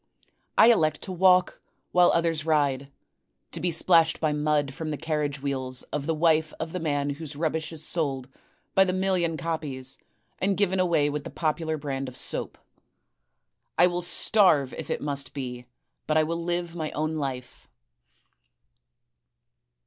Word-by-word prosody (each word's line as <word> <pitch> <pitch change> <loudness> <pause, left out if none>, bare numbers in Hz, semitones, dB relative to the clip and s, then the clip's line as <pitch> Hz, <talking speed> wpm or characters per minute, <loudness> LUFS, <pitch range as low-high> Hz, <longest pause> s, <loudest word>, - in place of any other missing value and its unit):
I 235 - +8
elect 155 -9 +1
to 190 - -6
walk 185 0 +3 0.3
while 175 0 +5
others 165 -2 +1
ride, 140 -3 +1 0.6
to - - -4
be 180 - 0
splashed 165 -1 +3
by 155 -2 +1
mud 150 -2 0
from 160 +2 -5
the 150 - -3
carriage 145 -3 -2
wheels 130 -2 -2
of 150 0 -2
the 165 - +1
wife 160 -1 +2
of 160 0 -4
the 180 - -2
man 145 -3 -1
whose 150 0 -6
rubbish 160 +1 -2
is 160 -1 -7
sold 135 -6 -2 0.5
by 190 - +6
the 185 -1 -1
million 185 -3 0
copies 145 -6 -4 0.4
and 195 0 +1
given 190 -2 +1
away 165 -5 +2
with 150 0 -3
the - - -6
popular 160 0 -1
brand 135 -2 -4
of 125 - -11
soap; - - -2 1.2
I - - +7
will 175 0 0
starve 175 - +3
if - - -7
it - - -2
must 140 -2 -3
be, 125 -3 -6 0.4
but 155 - +2
I 155 - +5
will 170 +2 -3
live 175 0 -2
my 155 -2 -3
own 155 +1 -1
life. 130 -4 -5
155 Hz, 160 wpm, -26 LUFS, 145-170 Hz, 1.2 s, I